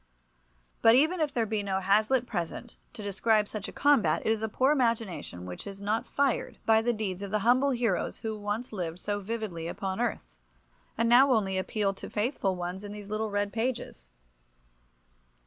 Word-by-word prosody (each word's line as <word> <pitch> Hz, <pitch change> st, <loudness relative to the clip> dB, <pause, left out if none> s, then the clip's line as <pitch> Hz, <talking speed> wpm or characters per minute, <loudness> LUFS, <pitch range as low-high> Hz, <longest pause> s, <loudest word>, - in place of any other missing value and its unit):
But 225 Hz, +1 st, +7 dB
even 315 Hz, +7 st, +3 dB
if 300 Hz, -2 st, +1 dB
there 240 Hz, -5 st, 0 dB
be 215 Hz, -1 st, -1 dB
no 195 Hz, -1 st, -1 dB
Hazlitt 215 Hz, +6 st, +3 dB
present 205 Hz, +3 st, -5 dB, 0.2 s
to 225 Hz, -3 st, -8 dB
describe 210 Hz, +2 st, +2 dB
such 215 Hz, -1 st, -5 dB
a -, -, -7 dB
combat 285 Hz, -5 st, +3 dB
it -, -, +3 dB
is 220 Hz, -1 st, 0 dB
a 220 Hz, -, -1 dB
poor 260 Hz, +6 st, +2 dB
imagination 230 Hz, -, -1 dB
which 90 Hz, -, -8 dB
is 195 Hz, -1 st, -8 dB
not 210 Hz, +3 st, -1 dB
fired 280 Hz, -3 st, 0 dB
by 220 Hz, 0 st, +5 dB
the 240 Hz, +2 st, +1 dB
deeds 205 Hz, -5 st, -3 dB
of 200 Hz, -, -5 dB
the 215 Hz, -, +1 dB
humble 255 Hz, +4 st, +4 dB
heroes 235 Hz, -8 st, 0 dB
who 220 Hz, -2 st, -4 dB
lived 210 Hz, +3 st, -4 dB
once 175 Hz, -3 st, -4 dB
so 205 Hz, 0 st, -1 dB
vividly 200 Hz, -6 st, -4 dB
upon 190 Hz, +3 st, -3 dB
earth, 220 Hz, -, -3 dB, 0.6 s
and 230 Hz, +1 st, +2 dB
now 255 Hz, +4 st, +6 dB
only 200 Hz, -5 st, +2 dB
appeal 195 Hz, +1 st, 0 dB
to 195 Hz, -, -9 dB
faithful 210 Hz, -3 st, -1 dB
ones 180 Hz, +2 st, -5 dB
in 205 Hz, 0 st, -7 dB
these 205 Hz, 0 st, -9 dB
little 215 Hz, 0 st, -1 dB
read 205 Hz, 0 st, -1 dB
pages. 225 Hz, -, -3 dB
215 Hz, 185 wpm, -29 LUFS, 195-235 Hz, 0.6 s, But